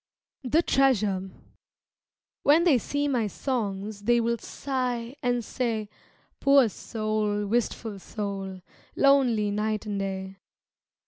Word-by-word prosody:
The 300 +7 +2
Treasure 210 - +2 1.1
When 310 +4 +5
they 305 -8 +5
see 285 +6 -1
my 245 -6 +1
songs 205 -3 -3
They 240 +3 +3
will 235 0 0
sigh 250 -2 -3
and 245 -2 0
say, 225 -4 -2 0.5
"Poor 275 -4 +5
soul, 215 -1 -2
wistful 220 -1 -1
soul, 195 -2 -5 0.3
Lonely 250 -7 +4
night 215 +1 -1
and 205 -2 -3
day." 190 0 -4
225 Hz, 110 wpm, -27 LUFS, 205-255 Hz, 1.1 s, When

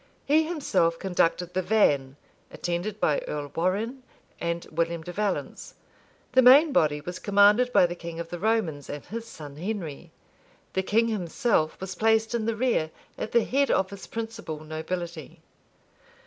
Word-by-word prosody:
He 315 +2 +4
himself 195 - +1
conducted 180 -1 0
the 185 - +1
van, 145 -10 +2 0.3
attended 175 +5 -3
by 150 - +2
Earl 145 -1 -4
Warrenne 205 +10 -1 0.4
and 170 0 -2
William 165 0 -1
de 175 - -7
Valence; 205 0 -3 0.6
the 260 - +5
main 280 +5 +7
body 150 - +2
was 180 +4 -6
commanded 205 +5 +4
by 180 - +6
the 175 - -2
king 170 -1 -8
of 170 0 -5
the 175 - -6
Romans 180 -9 0
and 145 -1 -6
his 230 +1 -6
son 150 -9 -10
Henry; 175 -5 -5 0.6
the 190 - +1
king 225 +4 +2
himself 200 - 0
was 190 0 -5
placed 220 +3 +2
in 230 -2 -1
the 230 - 0
rear 230 -9 +1 0.3
at 220 - -5
the 235 -1 +4
head 280 +2 +1
of 190 0 +1
his 200 -1 -9
principal 225 -9 -6
nobility. 160 0 -5
185 Hz, 160 wpm, -26 LUFS, 165-225 Hz, 0.6 s, main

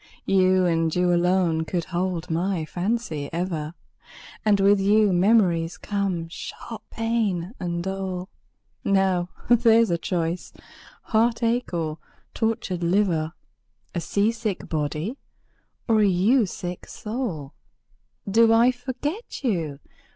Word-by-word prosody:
You, 185 -1 +4
you 170 +1 +2
alone 175 -2 +2
could 170 +1 -2
hold 175 0 -2
my 170 0 0
fancy 175 -5 -2
ever! 165 -2 -3 0.7
And 205 -2 +3
with 200 +1 +5
you 205 0 +4
memories 175 -4 +3
come, 195 -5 -2
sharp 215 +6 -8
pain, 220 -5 -1
and 170 -1 -2
dole. 190 -1 -3 0.6
Now 190 -3 +2 0.2
there's 230 -3 +5
a 170 - +1
choice 170 0 -2 0.5
heartache 230 +1 +1
or 160 -3 -2 0.3
tortured 225 -6 -1
liver! 170 -3 +1 0.6
A 170 - -2
sea 200 +6 +1
sick 225 -4 -4
body, 155 - -2 0.7
or 225 -2 +4
a 210 - +5
you 200 +6 +3
sick 180 0 -6
soul! 210 - -5 0.7
Do 225 +3 +5
I 230 +2 +5
forget 270 - -5
you? 165 - -1
185 Hz, 115 wpm, -24 LUFS, 170-220 Hz, 0.7 s, with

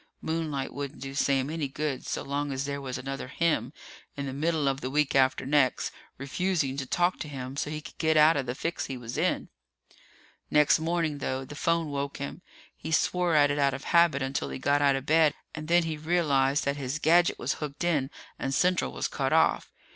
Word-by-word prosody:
Moonlight 155 -4 -2
wouldn't 140 0 -6
do 135 +1 -6
Sam 135 0 +1
any 160 -3 -2
good 140 -1 -4
so - - -3
long 145 +1 -2
as 135 +1 -2
there 140 0 -4
was 130 -2 -4
another 135 0 -5
him 165 +4 0 0.5
in 140 - -3
the 135 - -4
middle 155 +1 0
of 135 0 0
the 130 - -3
week 150 +1 +1
after 130 -1 +3
next, 135 -2 +2 0.3
refusing 140 0 -1
to 135 -2 -3
talk 175 +5 +1
to - - -5
him 130 -2 -6
so 145 - -2
he 155 0 -4
could 150 - -12
get 160 -1 +2
out 155 +2 +6
of 135 -3 -2
the 125 - -2
fix 165 +4 -3
he 135 - -5
was 120 0 -7
in. - - 0 1.0
Next 150 +1 +4
morning, 160 -2 -1
though, 130 0 -3
the 140 - -10
phone 165 +1 0
woke 140 0 -3
him. 140 +5 -6 0.3
He 160 - -7
swore 175 +1 +2
at 145 -1 +5
it 145 - -1
out 140 -2 +2
of 135 - -8
habit 170 -5 +3
until 135 +1 -2
he - - -5
got 145 +2 +1
out 140 -1 +4
of 135 0 -4
bed, 155 -1 +4 0.2
and 155 -1 -7
then 175 +1 +4
he 160 -1 -3
realized 150 -4 +1
that 140 +1 0
his 135 +1 -3
gadget 170 +3 +4
was - - -1
hooked 150 +1 -4
in 150 -6 +1 0.3
and 135 0 -1
Central 180 0 +2
was - - -2
cut - - -2
off. - - +3
145 Hz, 215 wpm, -28 LUFS, 135-160 Hz, 1.0 s, out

